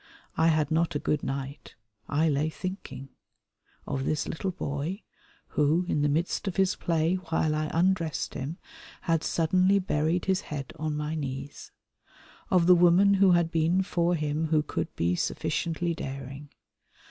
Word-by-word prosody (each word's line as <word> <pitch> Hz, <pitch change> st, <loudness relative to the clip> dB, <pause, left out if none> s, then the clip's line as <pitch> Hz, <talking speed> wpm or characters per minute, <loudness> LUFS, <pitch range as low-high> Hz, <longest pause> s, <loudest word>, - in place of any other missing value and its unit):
I 160 Hz, -, +3 dB
had 155 Hz, -2 st, +2 dB
not 165 Hz, 0 st, +1 dB
a -, -, +3 dB
good 150 Hz, 0 st, -1 dB
night. 135 Hz, +1 st, -5 dB, 0.3 s
I 155 Hz, +3 st, +2 dB
lay 150 Hz, +1 st, +1 dB
thinking. 185 Hz, -6 st, -7 dB, 0.8 s
Of 135 Hz, -2 st, -2 dB
this 150 Hz, +2 st, -1 dB
little 190 Hz, +4 st, -3 dB
boy, 170 Hz, +2 st, -4 dB, 0.5 s
who, 155 Hz, +4 st, +2 dB
in 150 Hz, -, 0 dB
the 145 Hz, -, +2 dB
midst 165 Hz, +7 st, -1 dB
of 190 Hz, -, -2 dB
his 190 Hz, -1 st, +2 dB
play 165 Hz, +2 st, +1 dB
while 160 Hz, -1 st, +1 dB
I 155 Hz, 0 st, -1 dB
undressed 170 Hz, -4 st, 0 dB
him, 145 Hz, +5 st, -5 dB, 0.4 s
had 165 Hz, -3 st, 0 dB
suddenly 185 Hz, +4 st, +3 dB
buried 170 Hz, -2 st, 0 dB
his 190 Hz, -1 st, +1 dB
head 140 Hz, -3 st, -6 dB
on 155 Hz, -1 st, -2 dB
my 150 Hz, +1 st, -2 dB
knees. 140 Hz, -2 st, -6 dB, 0.8 s
Of 180 Hz, -2 st, +4 dB
the 180 Hz, -, +8 dB
woman 180 Hz, +3 st, +5 dB
who 195 Hz, -2 st, +5 dB
had 170 Hz, -1 st, +2 dB
been 165 Hz, +3 st, +2 dB
for 175 Hz, -1 st, +1 dB
him 150 Hz, 0 st, -1 dB
who 155 Hz, -1 st, +2 dB
could -, -, -3 dB
be 85 Hz, +2 st, +1 dB
sufficiently 165 Hz, -, -1 dB
daring. 135 Hz, -1 st, -7 dB
160 Hz, 160 wpm, -28 LUFS, 150-175 Hz, 0.8 s, the